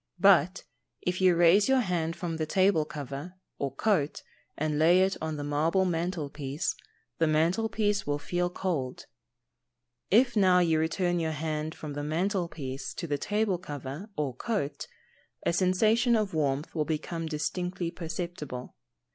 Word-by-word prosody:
But 185 Hz, 0 st, +5 dB, 0.4 s
if 180 Hz, +1 st, -1 dB
you 185 Hz, -2 st, +5 dB
raise 175 Hz, +6 st, +5 dB
your 265 Hz, -1 st, +4 dB
hand 170 Hz, -5 st, -1 dB
from 165 Hz, -3 st, -4 dB
the 155 Hz, -1 st, -2 dB
table 185 Hz, -3 st, +3 dB
cover, 150 Hz, +3 st, -7 dB, 0.2 s
or 140 Hz, -, -1 dB
coat, 155 Hz, -, 0 dB, 0.3 s
and 150 Hz, 0 st, -1 dB
lay 175 Hz, +4 st, +6 dB
it 190 Hz, +1 st, +2 dB
on 160 Hz, -1 st, -3 dB
the 145 Hz, -, -4 dB
marble 155 Hz, +6 st, +1 dB
mantel 170 Hz, -2 st, -1 dB
piece, 140 Hz, 0 st, -3 dB, 0.5 s
the 165 Hz, -, +3 dB
mantel 170 Hz, +8 st, +2 dB
piece 210 Hz, -2 st, 0 dB
will 145 Hz, 0 st, +1 dB
feel 175 Hz, +4 st, -1 dB
cold. 160 Hz, -9 st, -3 dB, 1.0 s
If 240 Hz, +4 st, +4 dB
now 185 Hz, -3 st, +5 dB
you 165 Hz, -3 st, +3 dB
return 175 Hz, +2 st, 0 dB
your 160 Hz, -1 st, -1 dB
hand 155 Hz, 0 st, -3 dB
from 150 Hz, -2 st, -7 dB
the 145 Hz, -, -4 dB
mantel 175 Hz, +4 st, 0 dB
piece 135 Hz, -4 st, -6 dB
to -, -, -4 dB
the 145 Hz, -3 st, -2 dB
table 210 Hz, -1 st, 0 dB
cover 145 Hz, -, -7 dB
or 145 Hz, -4 st, -1 dB
coat, 150 Hz, -, -3 dB, 0.6 s
a -, -, +2 dB
sensation 215 Hz, +7 st, +3 dB
of 210 Hz, -4 st, 0 dB
warmth 145 Hz, -2 st, -1 dB
will 155 Hz, -, 0 dB
become 165 Hz, +2 st, -3 dB
distinctly 175 Hz, +3 st, -2 dB
perceptible. 165 Hz, -6 st, -6 dB
170 Hz, 155 wpm, -29 LUFS, 150-185 Hz, 1.0 s, lay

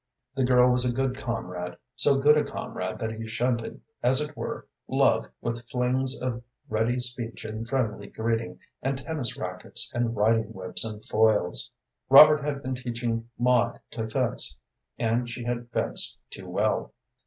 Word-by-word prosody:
The 135 Hz, -1 st, 0 dB
girl 125 Hz, 0 st, +5 dB
was 125 Hz, 0 st, +2 dB
a 125 Hz, -, +1 dB
good 130 Hz, +1 st, 0 dB
comrade, 90 Hz, -6 st, -4 dB, 0.2 s
so 140 Hz, +2 st, +4 dB
good 145 Hz, +2 st, +6 dB
a 150 Hz, -, +3 dB
comrade 90 Hz, 0 st, -5 dB
that 110 Hz, -2 st, -3 dB
she 110 Hz, 0 st, -6 dB
shunted, 115 Hz, +1 st, -1 dB, 0.2 s
as 130 Hz, +2 st, +4 dB
it 150 Hz, 0 st, -3 dB
were, -, -, -5 dB, 0.2 s
love -, -, +3 dB
with 120 Hz, 0 st, -4 dB
flings 130 Hz, +1 st, 0 dB
of 125 Hz, -2 st, -2 dB, 0.3 s
ready 115 Hz, +1 st, +1 dB
speech 120 Hz, -2 st, -4 dB
and 110 Hz, +2 st, -5 dB
friendly 110 Hz, -6 st, -1 dB
greeting, 115 Hz, 0 st, -2 dB, 0.2 s
and 135 Hz, +1 st, -1 dB
tennis 140 Hz, -3 st, -3 dB
rackets -, -, -3 dB
and 120 Hz, -1 st, 0 dB
riding 110 Hz, +1 st, +2 dB
whips 95 Hz, -3 st, 0 dB
and 110 Hz, -1 st, -5 dB
foils. 110 Hz, -4 st, +2 dB, 0.4 s
Robert 150 Hz, +2 st, +9 dB
had 145 Hz, -1 st, -3 dB
been 130 Hz, -, -2 dB
teaching 120 Hz, -2 st, -3 dB
Maud 120 Hz, -1 st, +2 dB
to 115 Hz, -1 st, -4 dB
fence, 120 Hz, -, -1 dB, 0.4 s
and 120 Hz, +1 st, 0 dB
she 120 Hz, +1 st, -6 dB
had 120 Hz, 0 st, -3 dB
fenced -, -, -1 dB
too -, -, -9 dB
well. -, -, 0 dB
120 Hz, 160 wpm, -27 LUFS, 110-130 Hz, 0.4 s, Robert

